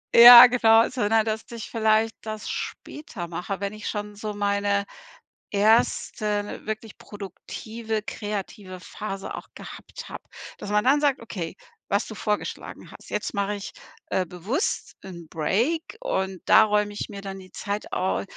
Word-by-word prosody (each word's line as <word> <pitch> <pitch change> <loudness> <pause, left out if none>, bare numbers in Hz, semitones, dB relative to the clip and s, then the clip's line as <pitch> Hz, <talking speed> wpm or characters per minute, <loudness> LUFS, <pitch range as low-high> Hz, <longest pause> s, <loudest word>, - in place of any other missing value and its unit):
Ja 240 +1 +12
genau, 230 -2 +5
sondern 225 -3 +1
dass 220 0 -1
ich 230 -2 -7
vielleicht 220 0 +2
das 215 -1 -6
später 220 - -6
mache, 180 +3 -4
wenn 200 +1 -3
ich 215 - -6
schon 210 0 -5
so 210 0 -5
meine 200 0 0 0.7
1. 210 0 +1
wirklich 220 0 -5
produktive, 215 +2 -6
kreative 205 -3 -6
Phase 195 +2 -6
auch - - -9
gehabt - - -10
hab. - - -8 0.3
Dass 205 - -7
man 210 +1 +3
dann 275 +3 +4
sagt: 285 -3 +2
„Okay“, 180 -7 -6 0.3
was 200 +2 0
du 220 - -8
vorgeschlagen 210 0 -4
hast: - - -14
„Jetzt - - -3
mach 200 0 0
ich, 200 -1 -5 0.4
äh, 185 - 0
bewusst 200 - -3
'n 170 -3 -10
Break 235 - 0 0.2
und 190 - -2
da - - +7
räum 210 -1 +1
ich 205 - -6
mir 200 -2 -8
dann 195 -1 -6
die 185 -1 -13
Zeit 205 +1 -5
au 185 +1 0
210 Hz, 155 wpm, -25 LUFS, 200-225 Hz, 0.7 s, Ja